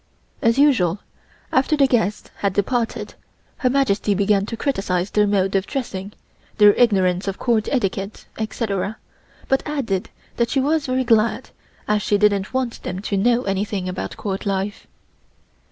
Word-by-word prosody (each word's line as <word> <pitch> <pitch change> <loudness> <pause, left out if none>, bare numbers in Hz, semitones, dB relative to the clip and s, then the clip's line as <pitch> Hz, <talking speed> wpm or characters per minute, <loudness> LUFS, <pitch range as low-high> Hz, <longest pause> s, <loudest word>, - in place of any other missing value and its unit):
As 230 +2 +3
usual 230 - +4 0.5
after 275 +4 +2
the 280 - +5
guests 225 -5 0
had 200 -2 0
departed 230 +4 -1 0.4
Her 255 - +1
Majesty 215 -6 +1
began 200 0 +2
to 230 - -5
criticise 195 -9 -1
their 210 -1 +3
mode 195 -1 +1
of 195 0 +1
dressing, 205 -7 -4 0.4
their 210 -1 +7
ignorance 190 -6 +2
of 195 - -2
Court 230 -3 +1
etiquette, 195 -5 -2
etc., 215 -2 -2 0.5
but 270 - +2
added 240 -11 -2 0.3
that 235 -1 +1
she 275 - +1
was 290 +1 +1
rather 260 0 +1
glad, 230 -2 +1 0.4
as 210 0 +2
she 205 - +2
didn't 200 -1 +2
want 260 -3 -2
them 180 +1 -4
to 205 - -2
know 240 +5 +2
anything 195 -1 -2
about 185 0 -5
Court 195 0 -4
life. 195 +1 -2
210 Hz, 155 wpm, -21 LUFS, 195-245 Hz, 0.5 s, their